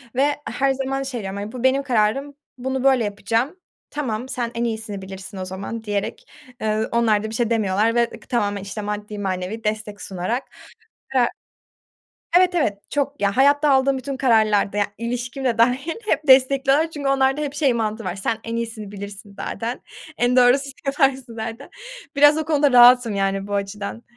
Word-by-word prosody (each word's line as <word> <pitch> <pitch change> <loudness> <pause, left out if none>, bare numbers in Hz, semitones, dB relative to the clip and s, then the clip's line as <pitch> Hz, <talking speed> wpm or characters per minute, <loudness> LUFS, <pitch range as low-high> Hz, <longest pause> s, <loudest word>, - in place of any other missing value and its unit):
ve 280 +3 +3 0.2
her 275 0 +1
zaman 270 0 -2
şey 260 -4 -4
diyorum, 195 0 -5
hani, 205 +1 -5
"Bu 250 0 -7
benim 265 +1 +3
kararım, 265 +3 0 0.2
bunu 265 +1 -3
böyle 265 -3 +4
yapacağım"; 225 - -1 0.3
"Tamam, 255 -4 -3
sen 240 -3 -3
en 230 - -1
iyisini 220 -3 -3
bilirsin 190 +1 -9
o 185 - -4
zaman." 195 +5 -6
diyerek, 205 -2 -3 0.4
eee, 215 0 0
onlar 220 -3 +2
da 220 - -3
bir 220 - -6
şey 235 -1 0
demiyorlar 220 0 +1
ve 240 - +4
ık - - -18
tamamen, 205 -5 0
işte, 200 +2 -6
maddi, 210 0 -5
manevi 190 +3 -3
destek 215 -1 -3
sunarak, 195 +7 -3 0.7
eee 245 -2 +4 1.1
Evet, 365 0 +4
evet. 215 - +1
Çok. 285 0 -2
Ya, 200 +2 +1
hayatta 285 +2 +4
aldığım 270 0 +3
bütün 275 +1 -5
kararlarda, 215 -6 +2
ya, 205 -1 +2
ilişkim 245 +3 -4
de 235 -3 +1
dâ 230 - +8
-hil 270 +6 -3
hep 305 - 0
destekliyorlar 275 +4 +5
çünkü 290 -3 -3
onlarda 270 +1 +2
hep 290 -2 -3
şey 285 -4 +2
mantığı 220 -1 -2
var: 180 - -3
Sen 220 +3 -2
en 230 0 -3
iyisini 225 -3 -5
bilirsin 200 0 -9
zaten, 235 +2 -4 0.4
en 245 +1 +2
doğrusunu 265 +3 +4
yaparsın 270 -4 +1
zaten. 225 +4 -6 0.5
Biraz 290 +2 +6
o 315 - -1
konuda 290 -3 +2
rahatım 245 -2 +7
yani 195 0 -1
bu 205 - -4
açıdan. 200 +3 -4
235 Hz, 180 wpm, -22 LUFS, 210-270 Hz, 1.1 s, dâ